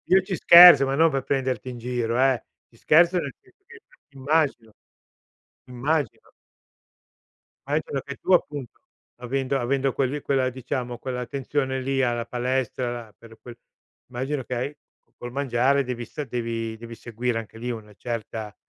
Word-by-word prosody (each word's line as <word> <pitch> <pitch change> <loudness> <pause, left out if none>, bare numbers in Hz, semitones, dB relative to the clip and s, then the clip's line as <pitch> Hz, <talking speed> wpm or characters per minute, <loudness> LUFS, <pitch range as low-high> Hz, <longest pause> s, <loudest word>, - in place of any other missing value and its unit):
io 190 - +6
ci 190 0 -4
scherzo, 170 -5 +9
ma 135 +1 -1
non 165 +2 +5
per 135 -2 -2
prenderti 130 -3 -2
in 125 - -7
giro 120 0 -2
eh, 130 -2 +2 0.3
ci 115 - -24
scherzo 170 +7 +4
nel 140 -5 -5
senso 380 +1 -28
che 465 -1 -14 0.3
immagino, 135 -4 -1 1.0
immagino. 135 +1 -2 1.4
Anche 150 +2 -2
perché 140 0 -4
tu 190 - -4
appunto 145 -7 -1 0.4
avendo 135 +2 -1
avendo 135 +2 0
quelli 140 +2 -1
quella 130 -2 +1
diciamo, 125 -1 -5
quell'attenzione 130 +2 -3
lì 135 0 0
alla 120 -2 0
palestra, 125 0 -2
alla 110 -3 -16
per 115 -1 -16
quel 120 -1 -11 0.5
immagino 130 +2 -3
che 125 - -5
hai 140 +5 -4 0.4
col 120 0 -8
mangiare 135 +1 +1
devi 120 -2 -5
sta 150 +6 -6
devi 115 -3 -4
devi 115 0 -10
seguire 120 +1 -3
anche 115 0 -10
lì 120 +2 -5
una 105 -2 -8
certa 110 -2 -6
130 Hz, 150 wpm, -24 LUFS, 120-140 Hz, 1.4 s, scherzo